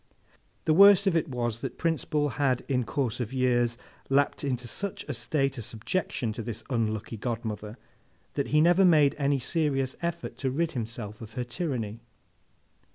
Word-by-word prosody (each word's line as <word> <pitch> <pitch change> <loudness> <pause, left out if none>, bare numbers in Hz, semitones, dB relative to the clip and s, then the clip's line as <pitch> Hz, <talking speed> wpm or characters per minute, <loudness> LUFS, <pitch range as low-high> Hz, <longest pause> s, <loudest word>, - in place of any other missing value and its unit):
The 155 - +4
worst 200 +2 +8
of 190 -3 +2
it 165 -1 +1
was, 120 -3 -2
that - - -5
Prince 165 -2 0
Bull 150 -2 +1
had 135 -2 0
in 125 -3 0
course 125 -3 -1
of 120 -2 -3
years 120 -2 +1 0.3
lapsed 140 +2 +2
into 125 -3 -2
such 200 - -3
a 145 - -2
state 135 +3 -1
of - - -5
subjection 115 0 -2
to 115 - -5
this 115 -1 -5
unlucky 110 -1 -1
godmother, 110 -1 -4 0.6
that 140 - -1
he 150 +1 +3
never 175 +4 +5
made 155 -6 +5
any 140 0 +2
serious 135 -1 0
effort 170 0 -3
to 135 - 0
rid 160 +5 0
himself 115 -4 -6
of 110 -1 -9
her 125 - -2
tyranny. 120 -5 -3
130 Hz, 170 wpm, -28 LUFS, 115-155 Hz, 0.6 s, worst